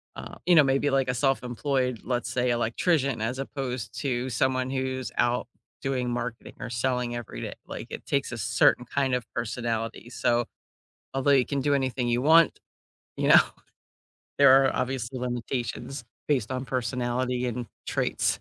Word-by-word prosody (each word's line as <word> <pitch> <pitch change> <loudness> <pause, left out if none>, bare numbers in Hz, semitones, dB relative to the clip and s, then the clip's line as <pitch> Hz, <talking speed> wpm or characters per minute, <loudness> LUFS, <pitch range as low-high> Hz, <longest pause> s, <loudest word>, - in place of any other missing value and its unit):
uh, - - -8
you 180 - +6
know, 155 - +8
maybe, 135 +1 +2
like, 135 -2 +1
a - - +2
self-employed, 125 0 0
let's 125 -1 -2
say, 125 0 +1
electrician 125 +2 +1
as 125 +4 -1
opposed 125 -5 -4
to 130 -2 -1
someone 130 +2 +1
who's 130 -1 -2
out 120 0 +2 0.4
doing 130 -2 -1
marketing 120 -1 -4
or - - -5
selling 125 0 -1
every 115 - -6
day. - - -4
Like, - - -7
it - - -7
takes 140 -2 0
a 120 - -4
certain 120 +2 +3
kind 135 +1 0
of 125 - -3
personality, 115 0 -3
so, 120 -1 +1 0.7
although 135 +1 +2
you 130 -3 +5
can 140 -1 -2
do 145 +1 +2
anything 130 -2 0
you 120 +1 +1
want, 160 +3 +5 0.6
you - - 0
know, - - +9 1.0
there 135 -1 +7
are - - +1
obviously 130 -1 -2
limitations 125 +2 -3 0.2
based 130 -6 +1
on 130 0 -2
personality 125 0 -1
and 120 0 -3 0.2
traits. - - 0
125 Hz, 160 wpm, -27 LUFS, 120-135 Hz, 1.0 s, know